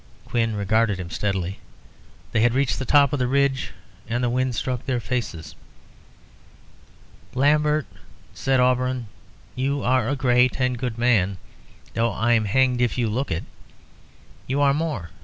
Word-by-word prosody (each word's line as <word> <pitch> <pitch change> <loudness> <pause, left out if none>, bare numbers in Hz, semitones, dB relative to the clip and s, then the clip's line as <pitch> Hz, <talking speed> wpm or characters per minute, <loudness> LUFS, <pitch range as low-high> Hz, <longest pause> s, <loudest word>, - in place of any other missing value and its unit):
Quin 115 -2 0
regarded 105 0 +1
him 90 -1 -6
steadily. 95 -2 -2 0.7
They 110 - +1
had 120 +1 +3
reached 135 -1 +1
the 130 - -3
top 140 +1 +4
of 145 - 0
the 125 - +1
ridge 135 0 +1 0.4
and 120 +2 -1
the 120 - +1
wind 130 0 0
struck 125 +1 -2
their 130 -2 0
faces. 110 -11 -4 1.8
"Lambert," 150 +2 +2 0.5
said 135 -1 +1
Auberon, 125 -2 +1 0.5
"you 135 +2 -1
are 130 -2 +2
a 145 - 0
great 125 -1 +2
and 125 -1 +1
good 120 -3 -3
man, 105 -6 +2 0.6
though 115 0 0
I'm 115 -1 +2
hanged 125 +3 +2
if 120 0 +1
you 120 -3 +1
look 130 +5 -2
it. 80 - -2 1.0
You 135 +2 -1
are 140 -1 +4
more. 150 - -3
125 Hz, 150 wpm, -23 LUFS, 115-130 Hz, 1.8 s, top